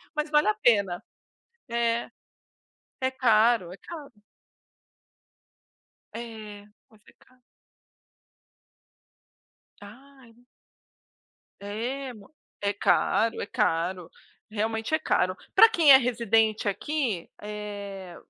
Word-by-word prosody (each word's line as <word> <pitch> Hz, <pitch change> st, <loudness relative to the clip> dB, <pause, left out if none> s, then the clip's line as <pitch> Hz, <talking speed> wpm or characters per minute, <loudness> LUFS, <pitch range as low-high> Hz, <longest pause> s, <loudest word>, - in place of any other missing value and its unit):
mas 300 Hz, 0 st, -2 dB
vale 300 Hz, -6 st, +4 dB
a 215 Hz, -, +2 dB
pena, 200 Hz, -7 st, +2 dB, 0.7 s
é. 235 Hz, 0 st, 0 dB, 0.9 s
É 260 Hz, -, +1 dB
caro, 225 Hz, -6 st, +3 dB
é 190 Hz, -, -10 dB
caro. 305 Hz, -6 st, -10 dB, 2.0 s
É, 215 Hz, -3 st, -9 dB, 0.2 s
mas 215 Hz, -2 st, -23 dB
é -, -, -19 dB
caro. 255 Hz, 0 st, -26 dB, 2.4 s
Ai. 245 Hz, +2 st, -16 dB, 1.1 s
É 245 Hz, +6 st, -5 dB
mui 205 Hz, -3 st, -15 dB, 0.3 s
é 200 Hz, 0 st, +1 dB
caro, 225 Hz, +2 st, +1 dB
é -, -, -3 dB
caro, 180 Hz, -5 st, -1 dB, 0.4 s
realmente 220 Hz, +5 st, -2 dB
é 315 Hz, -, +3 dB
caro. 185 Hz, +1 st, +1 dB, 0.2 s
Pra 450 Hz, -, +9 dB
quem 320 Hz, -8 st, +5 dB
é 265 Hz, -, +11 dB
residente 225 Hz, -4 st, +1 dB
aqui, 240 Hz, -, -2 dB
eh, 205 Hz, -3 st, -7 dB
225 Hz, 95 wpm, -26 LUFS, 205-255 Hz, 2.4 s, é